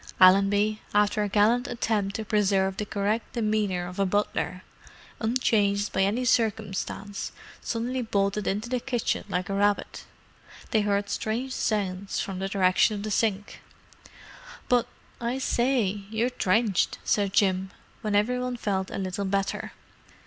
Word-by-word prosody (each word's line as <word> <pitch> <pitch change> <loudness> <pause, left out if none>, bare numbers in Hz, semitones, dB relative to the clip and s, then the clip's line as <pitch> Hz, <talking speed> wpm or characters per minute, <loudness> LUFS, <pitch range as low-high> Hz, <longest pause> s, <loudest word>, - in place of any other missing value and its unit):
Allenby, 200 +3 +5
after 210 +1 +3
a 205 - 0
gallant 225 +6 +3
attempt 210 -5 -1
to 220 - -3
preserve 195 -2 +2
the 210 - -3
correct 205 +3 -1
demeanour 210 -5 0
of 180 +2 -8
a 195 - +3
butler, 185 -2 -1 0.6
unchanged 215 -3 +1
by 190 - +1
any 215 +6 +1
circumstance, 205 -3 -1 0.3
suddenly 245 +3 -2
bolted 200 -2 0
into 210 +4 -1
the 250 +1 -1
kitchen 240 -2 -1
like 180 -1 -1
a 195 - -3
rabbit. 205 +1 0 0.7
They 220 - +3
heard 200 0 0
strange 245 +4 -2
sounds 200 -4 -1
from 190 -2 -3
the 195 0 -2
direction 195 +2 +3
of 200 - -5
the 215 - -3
sink. 205 -1 -1 1.1
"But, 245 -2 +3 0.3
I 240 +2 -2
say, 240 -6 +1
you're 225 +3 0
drenched!" 210 -3 +1
said 200 -2 +1
Jim, 190 -1 +2 0.3
when 210 -2 -1
every 240 +5 +2
one 250 -1 -3
felt 195 -4 -1
a - - -5
little 190 +1 -3
better. 195 0 -1
205 Hz, 145 wpm, -27 LUFS, 195-225 Hz, 1.1 s, Allenby